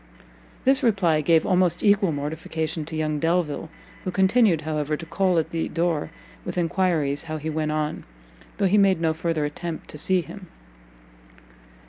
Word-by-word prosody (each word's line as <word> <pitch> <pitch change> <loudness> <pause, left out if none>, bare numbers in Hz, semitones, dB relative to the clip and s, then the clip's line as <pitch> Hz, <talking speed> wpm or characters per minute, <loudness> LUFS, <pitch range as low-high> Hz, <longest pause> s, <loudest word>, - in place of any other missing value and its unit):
This 265 +2 +5
reply 190 - +2
gave 160 +1 +3
almost 180 -2 +2
equal 200 -3 +4
mortification 155 +2 -3
to 160 - -7
young 155 -1 -1
Delvile, 165 -1 0 0.3
who - - -3
continued, 190 -2 +3
however, 150 -1 -2
to 165 - -8
call 180 +2 +1
at 160 - 0
the 165 -1 -2
door 165 -3 -1 0.3
with - - -6
enquiries 165 -5 0
how 155 -1 -4
he 155 +1 -4
went 155 0 -1
on, 155 0 -2 0.5
though 200 - +1
he 200 +2 +4
made 195 -3 +4
no 165 -1 +1
further 160 -1 -1
attempt 160 +2 -6
to 150 - -8
see 185 +3 +2
him. 185 +2 -11
165 Hz, 160 wpm, -24 LUFS, 155-185 Hz, 0.5 s, This